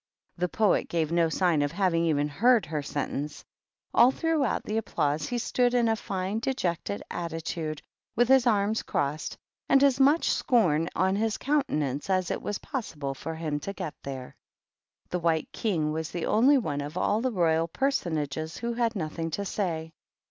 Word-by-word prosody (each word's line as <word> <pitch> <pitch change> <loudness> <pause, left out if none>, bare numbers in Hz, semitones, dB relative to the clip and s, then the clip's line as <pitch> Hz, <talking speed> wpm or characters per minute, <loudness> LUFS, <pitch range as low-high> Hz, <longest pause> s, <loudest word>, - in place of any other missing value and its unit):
The 180 0 -1
Poet 215 +2 +2
gave 160 -2 0
no 170 -1 +3
sign 170 -2 +2
of 145 0 0
having 170 -2 +1
even 145 -3 +1
heard 225 - +3
her 150 -1 -3
sentence. 145 +1 -4 0.5
All 240 +2 +7
throughout 310 -2 0
the 215 - -2
applause 150 -8 -1
he 245 - -2
stood 245 +1 +1
in 240 -1 +3
a 225 - +2
fine 195 0 -3
dejected 180 - -2
attitude, 165 -2 -4 0.3
with 240 +1 +3
his 260 -1 +5
arms 215 -1 +2
crossed, 145 +2 -2 0.3
and 275 0 +5
as 275 -2 +4
much 285 +5 +4
scorn 170 - +2
on 190 +2 +2
his 220 0 0
countenance 155 - -1
afi 185 -2 +1
it - - -2
was 205 - -3
possible 150 - -4
for 160 +4 -6
him 155 -2 -2
to 195 +7 -5
get 185 -6 -5
there. 130 -2 -7 0.7
The 180 - -1
White 165 -2 0
King 165 -9 -1
was 160 0 -3
the 175 - -3
only 260 +7 +5
one 145 - -2
of 145 +4 -6
all 205 +4 +1
the 255 +1 0
Royal 165 -4 +2
Personages 160 - -2
who 235 0 -2
had 235 -1 0
nothing 165 -2 -3
to 200 +5 -3
say. 165 -5 -3
175 Hz, 175 wpm, -27 LUFS, 155-230 Hz, 0.7 s, All